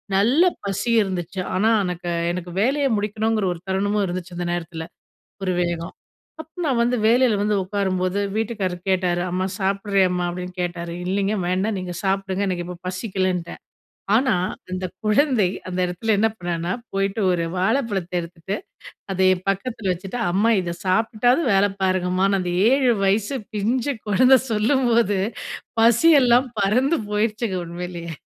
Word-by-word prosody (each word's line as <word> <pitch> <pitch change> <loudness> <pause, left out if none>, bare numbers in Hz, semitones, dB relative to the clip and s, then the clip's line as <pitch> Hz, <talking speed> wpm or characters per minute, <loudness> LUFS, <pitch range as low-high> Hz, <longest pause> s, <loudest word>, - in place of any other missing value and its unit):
நல்ல 240 - +4 0.2
பசி 200 +3 -2
இருந்துச்சு 185 -2 -3 0.2
ஆனா 210 +4 +3
எனக்கு 180 -1 -4 0.2
எனக்கு 175 0 -5
வேலைய 275 +6 +2
முடிக்கணுங்கிற 215 +1 0
ஒரு 170 - -10
தருணமும் 200 +2 0
இருந்துச்சு 180 0 -5
அந்த 175 - -3
நேரத்தில. 165 -1 -4 0.6
ஒரு 185 -1 0
வேகம். 170 0 -2 0.5
அப்போ 320 0 -10
நான் 260 -5 +1
வந்து 245 +1 +1
வேலைல 235 -1 +4
வந்து 210 0 +1
உக்காரும்போது, 185 -1 -1 0.2
வீட்டுக்காரரு 205 -5 -2
கேட்டாரு 180 -2 +1
"அம்மா 185 +1 -1
சாப்பிடுறியா 195 0 +1
மா?" 175 - 0
அப்டின்னு 180 +1 -6
கேட்டாரு. 170 -1 -4
இல்லைங்க 200 +3 0
வேண்டாம். 195 +4 0
நீங்க 180 -1 -5
சாப்பிடுங்க. 195 0 0
எனக்கு 175 -1 -2
இப்போ 180 0 -7
பசிக்கலன்ட்டேன். 185 -2 -2 0.6
ஆனா, 260 -1 +3 0.4
அந்த 185 0 -2 0.2
குழந்தை, 215 -2 +3 0.2
அந்த 180 - -4
எடத்துல 210 +5 0
என்ன 220 +2 +4
பண்ணான்னா, 175 0 -2 0.2
போயிட்டு 195 +2 0
ஒரு 170 -1 0
வாழைப்பழத்த 195 -3 0
எடுத்துட்டு, 170 +3 -5 0.6
அதை 190 0 +1
என் 185 +1 -11
பக்கத்தில 195 0 -3
வச்சுட்டு, 185 +6 -6
அம்மா 210 +5 +3
இதை 170 -1 -4
சாப்பிட்டாவது 225 - +2
வேலைபாருங்கம்மான்னு. 195 -1 +1
அந்த 180 -1 -2 0.2
7 265 -3 +4
வயசு 205 +6 +1 0.2
பிஞ்சு 240 +7 0
கொழந்த 255 +6 +6
சொல்லும்போது, 230 -2 +2 0.6
பசியெல்லாம் 250 +1 +5
பறந்து 255 +10 +2
போயிடுச்சுங்க. 210 -1 0
உண்மையிலயே. 170 -1 -6
195 Hz, 135 wpm, -22 LUFS, 180-225 Hz, 0.6 s, கொழந்த